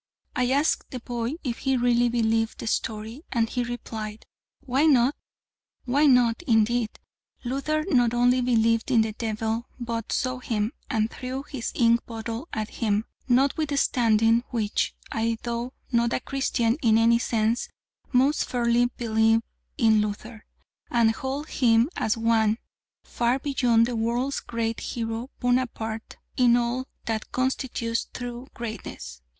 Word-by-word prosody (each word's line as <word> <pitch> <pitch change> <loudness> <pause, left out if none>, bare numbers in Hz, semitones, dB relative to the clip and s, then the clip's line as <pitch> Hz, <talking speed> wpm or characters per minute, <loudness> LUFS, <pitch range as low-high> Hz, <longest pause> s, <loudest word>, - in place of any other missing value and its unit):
I 250 0 +1
asked 285 +4 +1
the 255 - -5
boy 240 +1 -3
if 245 -5 -3
he 265 -1 +1
really 240 0 +3
believed 225 -1 +1
the - - -6
story, 220 +3 -3
and 230 -2 +1
he 245 +2 -2
replied, 220 -3 -6 0.4
"Why 270 +5 +2
not?" 260 -2 +4 0.7
Why 280 +4 +3
not, 245 -2 +4
indeed! 225 0 +2 0.5
Luther 275 +5 -1
not 245 -3 +3
only 245 +1 +4
believed 230 -2 +2
in 240 -4 +5
the 220 0 0
devil, 225 +1 -2
but 230 -2 -4
saw 255 0 -1
him, 220 -1 -1 0.2
and 220 0 0
threw 260 +1 -5
his 275 -5 -5
ink 235 -1 +3
bottle 230 +4 -5
at 215 -1 -3
him; 215 -1 +1 0.2
notwithstanding 245 -4 +3
which, 220 -4 -1 0.2
I, 225 0 0
though 235 +1 -3 0.2
not 235 -1 +2
a - - +1
Christian 255 -3 0
in 225 -3 +4
any 230 +1 +4
sense, 225 0 0 0.4
most 275 +4 +3
firmly 240 0 +2
believe 225 -1 +2 0.3
in 220 -2 +4
Luther, 215 +2 -5 0.4
and 230 -2 +4
hold 270 +6 -4
him 235 +1 +3
as 220 - 0
one 225 -1 +2 0.5
far 240 +2 0
beyond 250 -5 +2
the 240 0 -3
world's 240 +5 0
great 230 -1 -3
hero 230 +1 -4
Bonaparte 245 -3 -1 0.2
in 245 -1 +5
all 245 +2 -1 0.2
that 220 -1 -3
constitutes 255 -3 -1
true 245 +1 -6
greatness. 180 - -7
235 Hz, 140 wpm, -26 LUFS, 225-250 Hz, 0.7 s, in